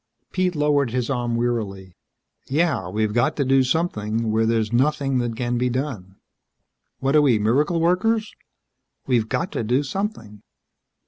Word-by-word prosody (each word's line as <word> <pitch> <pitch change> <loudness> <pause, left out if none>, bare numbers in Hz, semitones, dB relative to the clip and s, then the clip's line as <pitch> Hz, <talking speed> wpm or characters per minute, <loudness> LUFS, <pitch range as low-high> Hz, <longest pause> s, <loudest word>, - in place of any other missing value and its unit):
Pete 185 -1 0
lowered 145 -3 +2
his 125 +1 -2
arm 120 -2 -1
wearily. 105 -6 -3 0.5
"Yeah 140 - 0
we've 105 +2 -1
got 135 +7 +1
to 140 - 0
do 135 +1 +4
something. 115 -6 -1
Where 110 +1 +2
there's 110 -1 0
nothing 135 +1 +1
that 120 -2 -2
can 120 -1 -1
be 125 0 +1
done. 120 -8 -4 0.9
What 135 +2 +1
are 150 - +7
we 130 -6 +4
miracle 140 +11 +1
workers?" 215 +6 +1 0.7
"We've 120 -4 +1
got 170 - -1
to - - -2
do 125 +6 +1
something." 140 - -5
125 Hz, 150 wpm, -22 LUFS, 110-150 Hz, 0.9 s, are